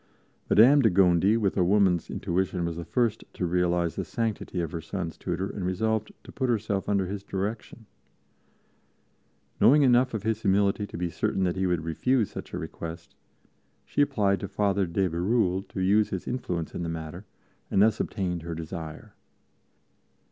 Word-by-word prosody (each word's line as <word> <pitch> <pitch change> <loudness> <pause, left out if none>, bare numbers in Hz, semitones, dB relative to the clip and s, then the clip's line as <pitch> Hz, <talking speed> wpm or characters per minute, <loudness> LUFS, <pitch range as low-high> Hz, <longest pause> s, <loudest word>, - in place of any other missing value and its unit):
Madame 135 +7 +7
de 115 - +5
Gondi, 95 +2 +4
with 100 -4 0
a 95 - +3
woman's 95 -2 +2
intuition, 90 0 -1
was 85 -1 -3
the 85 - -5
first 110 +6 0
to 90 - -2
realize 85 -1 +1
the - - -1
sanctity 110 -5 -3
of 85 -3 -2
her 85 - -4
sons' 85 0 -5
tutor 90 +1 -3
and 100 - -6
resolved 110 +4 -1
to - - -12
put 130 -2 -2
herself 105 -4 -1
under 100 -2 +2
his 100 +2 -5
direction. 105 +4 -5 1.7
Knowing 145 +3 +6
enough 125 -1 +4
of 105 - -4
his 110 0 -1
humility 100 0 +2
to - - -8
be 85 0 -2
certain 95 - -1
that 90 -1 0
he 95 0 0
would 90 -3 0
refuse 115 - +1
such - - -8
a - - -4
request, 85 0 -7 0.7
she - - 0
applied 100 -8 +2
to 100 - -4
Father 100 -2 0
de 95 +3 0
Bérulle 95 +2 0
to - - -7
use 100 +3 +3
his 95 - -5
influence 90 -10 -3
in - - -4
the 85 - -3
matter, 80 +4 -6 0.4
and - - +1
thus 110 0 +3
obtained 90 -5 -2
her 85 0 -5
desire. 80 -1 -7
95 Hz, 175 wpm, -27 LUFS, 85-105 Hz, 1.7 s, Madame